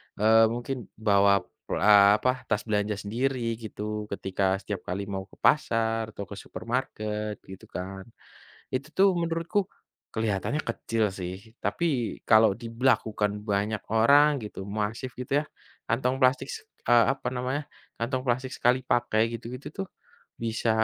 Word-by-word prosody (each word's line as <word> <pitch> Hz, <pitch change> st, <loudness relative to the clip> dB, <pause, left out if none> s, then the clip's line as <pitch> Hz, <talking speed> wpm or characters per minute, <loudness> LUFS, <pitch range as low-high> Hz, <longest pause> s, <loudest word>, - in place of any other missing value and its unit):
eee, 110 Hz, +2 st, +6 dB
mungkin 120 Hz, 0 st, -4 dB
bawa, 100 Hz, -2 st, +4 dB, 0.2 s
eee, 100 Hz, -1 st, +6 dB
apa 130 Hz, +2 st, -1 dB
tas 105 Hz, -1 st, 0 dB
belanja 105 Hz, -1 st, 0 dB
sendiri 115 Hz, +3 st, -1 dB
gitu 105 Hz, -1 st, -5 dB
ketika 95 Hz, -1 st, 0 dB
setiap 100 Hz, -4 st, -4 dB
kali 95 Hz, +3 st, -2 dB
mau 95 Hz, -1 st, -4 dB
ke -, -, -19 dB
pasar 115 Hz, -5 st, +2 dB
atau 100 Hz, -, -4 dB
ke 100 Hz, +1 st, -9 dB
supermarket 110 Hz, -3 st, -3 dB
gitu 95 Hz, -1 st, -11 dB
kan. 95 Hz, +2 st, -6 dB, 0.7 s
Itu 140 Hz, +3 st, -2 dB
tuh 195 Hz, +3 st, +5 dB
menurutku, 170 Hz, +4 st, 0 dB, 0.5 s
kelihatannya 110 Hz, +4 st, -1 dB
kecil 115 Hz, -1 st, 0 dB
sih 95 Hz, +4 st, -7 dB
tapi 170 Hz, -, 0 dB, 0.4 s
kalau 110 Hz, -1 st, +6 dB
diberlakukan 110 Hz, -2 st, 0 dB
banyak 105 Hz, +1 st, 0 dB, 0.2 s
orang 140 Hz, +4 st, +5 dB
gitu 105 Hz, -2 st, -7 dB
masif 110 Hz, +5 st, -3 dB
gitu 125 Hz, +3 st, 0 dB
ya, 150 Hz, -, -1 dB, 0.4 s
kantong 125 Hz, +3 st, 0 dB
plastik 130 Hz, 0 st, +3 dB
s -, -, -6 dB, 0.2 s
eee, 120 Hz, -1 st, +6 dB
apa -, -, -4 dB
namanya, 130 Hz, +4 st, -1 dB, 0.4 s
kantong 130 Hz, +2 st, -1 dB
plastik 130 Hz, +2 st, 0 dB
sekali 125 Hz, +2 st, +3 dB
pakai 120 Hz, -3 st, +2 dB
gitu-gitu 125 Hz, +4 st, -7 dB
tuh, 190 Hz, -, -8 dB, 0.5 s
bisa 115 Hz, 0 st, 0 dB
115 Hz, 140 wpm, -27 LUFS, 105-125 Hz, 0.7 s, eee